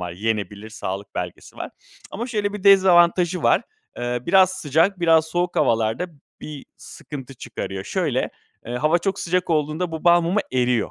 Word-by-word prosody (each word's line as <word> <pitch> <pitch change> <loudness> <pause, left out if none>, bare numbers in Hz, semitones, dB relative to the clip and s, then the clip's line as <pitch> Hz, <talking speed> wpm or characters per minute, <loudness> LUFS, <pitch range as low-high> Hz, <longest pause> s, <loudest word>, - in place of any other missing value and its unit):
var. 90 -1 -5
Yenebilir 105 +1 -3
sağlık 100 -2 -6
belgesi 90 -1 -6
var - - -6 0.4
ama 235 +4 -4
şöyle 210 -5 -2
bir 205 -1 -7
dezavantajı 180 -2 +5
var. - - +3 0.3
Eee, 120 0 -2
biraz 185 +1 +5
sıcak, 180 +1 +1
biraz 165 -2 +4
soğuk 175 +2 -2
havalarda 115 +9 +1 0.3
bir 150 -2 -8
sıkıntı 135 -3 -10
çıkarıyor. 95 -5 -6
Şöyle, 150 -9 -1 0.4
eee, 120 - -5
hava 155 +6 +2
çok 195 +2 -2
sıcak 180 +1 -1
olduğunda 155 +2 0
bu 160 - -6
balmumu 175 +3 +4
eriyor. 125 -2 +1
160 Hz, 155 wpm, -22 LUFS, 120-180 Hz, 0.4 s, dezavantajı